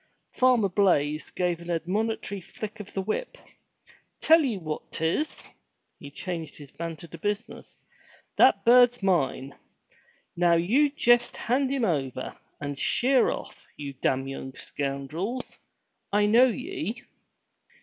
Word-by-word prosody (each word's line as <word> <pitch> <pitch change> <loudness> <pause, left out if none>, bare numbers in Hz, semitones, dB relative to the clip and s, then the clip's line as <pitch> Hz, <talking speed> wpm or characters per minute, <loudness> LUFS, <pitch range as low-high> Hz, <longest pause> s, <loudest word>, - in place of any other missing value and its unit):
Farmer 250 -5 +4
Blaize 160 -6 +1
gave 175 -2 -1
an 170 0 -10
admonitory 200 +4 -2
flick 215 +4 -8
of 210 - -9
the 195 - -1
whip. - - -3 0.8
"Tell 325 +1 +6
ye 250 -8 -1
what 155 -4 -6
'tis!" 165 - -1 0.6
He 145 - -9
changed 165 0 -6
his 145 -3 -12
banter 165 -1 -6
to 165 0 -11
business. 205 +5 -5 0.3
" - - -28
That - - +5
bird's 245 -1 +6
mine! 140 -7 0 0.8
Now 170 -1 +4
you 235 - +3
jest 240 -4 +2
hand 260 +3 0
him 270 -4 +1
over, 135 - -2 0.2
and 145 -1 -5
sheer 260 0 +3
off, - - -7
you 140 -2 -6
damn 135 0 -1
young 135 -1 -7
scoundrels! 150 - -4 0.5
I 205 +1 +3
knowye 250 - +1
190 Hz, 130 wpm, -27 LUFS, 155-240 Hz, 0.8 s, Tell